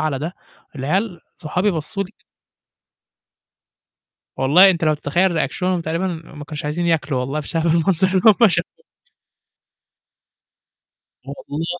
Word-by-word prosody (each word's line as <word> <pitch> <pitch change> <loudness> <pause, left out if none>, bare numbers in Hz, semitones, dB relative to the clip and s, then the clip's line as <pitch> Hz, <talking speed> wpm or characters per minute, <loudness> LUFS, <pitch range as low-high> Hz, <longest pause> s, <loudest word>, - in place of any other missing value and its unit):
على 155 -4 -1
ده، 160 +5 -4 0.4
العيال 175 - -1 0.2
صحابي 180 +6 -1
بصّوا 170 +4 -3
لي 185 - -13
ك - - -38 2.1
والله 160 +9 +6
أنت 175 -2 0
لو 155 -1 +3
تتخيّل 170 +6 0
ريأكشنهم 180 +2 -1
تقريبًا 165 +4 -2
ما 160 -3 -7
كانوش 150 -1 -7
عايزين 170 +4 -2
ياكلوا 150 -5 0
والله 135 +4 -2
بسبب 165 +2 -2
المنظر 170 +2 +2
اللي 185 -1 +1
هُم 220 0 +6
شافوه. - - -3 2.4
والله 145 +3 -6
165 Hz, 120 wpm, -20 LUFS, 150-185 Hz, 2.4 s, والله